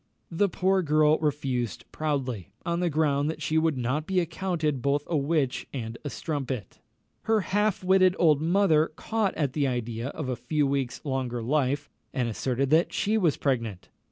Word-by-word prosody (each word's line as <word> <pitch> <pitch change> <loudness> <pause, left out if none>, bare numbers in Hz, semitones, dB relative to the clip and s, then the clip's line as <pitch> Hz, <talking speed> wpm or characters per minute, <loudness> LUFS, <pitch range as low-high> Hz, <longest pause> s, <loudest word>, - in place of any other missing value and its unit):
The 200 +4 +2
poor 190 +2 +2
girl 155 -1 +3
refused 135 - -2
proudly, 130 - -2 0.2
on 170 0 0
the 175 -1 +1
ground 145 -1 +1
that 160 - -4
she 155 +1 +1
would 160 -3 +1
not 130 +6 -1
be 190 -1 +2
accounted 165 -5 -1
both 140 +2 +1
a 170 - -2
witch 145 -2 0
and 115 -4 -4
a 145 - -3
strumpet. 135 - -4 0.5
Her 220 -1 +3
half 205 +1 0
witted 185 0 +4
old 155 -4 +4
mother 165 -2 +3
caught 220 +1 -1
at 140 -5 -1
the 145 -2 +1
idea 120 -1 -3
of 145 0 -5
a 130 - -1
few 145 +5 0
weeks' 135 -2 -1
longer 130 -4 -2
life, 145 +2 0 0.3
and 125 -2 +1
asserted 130 +4 -1
that 160 +3 +4
she 215 +2 0
was 175 -9 +2
pregnant. 115 -9 -2
150 Hz, 175 wpm, -27 LUFS, 130-165 Hz, 0.5 s, witted